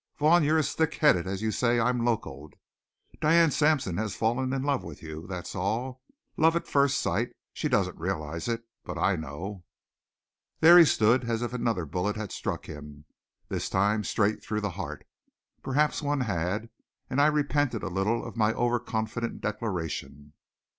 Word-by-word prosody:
Vaughn, 155 +3 +5
you're 155 +2 +3
as 155 - 0
thickheaded 150 - +2
as 95 +2 -3
you 110 - +1
say 120 +1 +2
I'm 120 +1 +1
locoed. 75 - -3 0.7
Diane 165 +1 +5
Sampson 145 - +1
has 110 -2 -2
fallen 125 +4 0
in 135 0 -1
love 140 -2 0
with 85 -2 -10
you! 80 +2 -8
That's 90 -2 -6
all. 120 +7 -2 0.4
Love 165 +1 +4
at 170 - -2
first 140 -1 +2
sight! - - -1 0.2
She - - -2
doesn't - - 0
realize 80 -1 -3
it. 115 -1 -2 0.2
But - - -6
I 100 - +2
know." 85 +5 -6 1.0
There 170 +2 +9
he 170 - +9
stood 120 -1 +3
as 115 0 0
if 120 0 -3
another 115 -8 -1
bullet 90 +7 -2
had 110 -2 -5
struck - - -4
him, 75 -1 -10 0.4
this - - -2
time 105 +3 +1
straight 105 +2 0
through 105 0 -2
the 105 -1 -2
heart. 95 +2 -6 0.6
Perhaps 150 +4 +1
one 145 -2 0
had 100 +1 -2 0.4
and 130 +1 +1
I 145 - +6
repented 145 -5 +1
a - - -2
little 95 +5 -1
of - - -8
my 110 -1 +2
overconfident 115 -1 -1
declaration. 85 -9 -4
110 Hz, 165 wpm, -28 LUFS, 95-130 Hz, 1.0 s, There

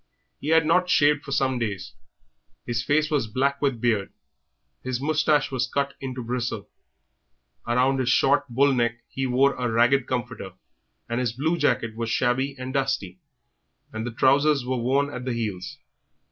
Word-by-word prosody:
He - - -7
had 160 0 +4
not 180 +3 +2
shaved 145 -3 +3
for 140 - -9
some 130 -2 +1
days, 100 -5 -4 0.7
his 120 -1 -2
face 155 +3 +1
was 140 -7 +1
black 140 +5 0
with 135 -5 0
beard; 110 -4 0 0.7
his 130 -1 -3
moustache 150 0 +1
was 130 -1 -1
cut 140 +2 -1
into 130 -2 -5
bristle; 125 +1 -3 1.0
around 130 +3 +2
his 130 -1 0
short, 140 +3 +3
bull 135 +4 +3
neck 120 -1 -1
he 135 0 -2
wore 135 +2 +3
a 125 -1 -2
ragged 120 +3 +3
comforter, 120 -6 -4 0.5
and 120 +1 -2
his 120 -3 -1
blue 155 +7 0
jacket 115 -8 0
was 115 0 -3
shabby 130 +4 0
and 130 0 -6
dusty, 135 -10 -2 0.7
and 110 0 -4
the - - -4
trousers 140 +3 +3
were 130 0 -1
worn 135 +4 +1
at 125 - -6
the 130 -1 -2
heels. 105 -6 -4
130 Hz, 165 wpm, -25 LUFS, 120-140 Hz, 1.0 s, had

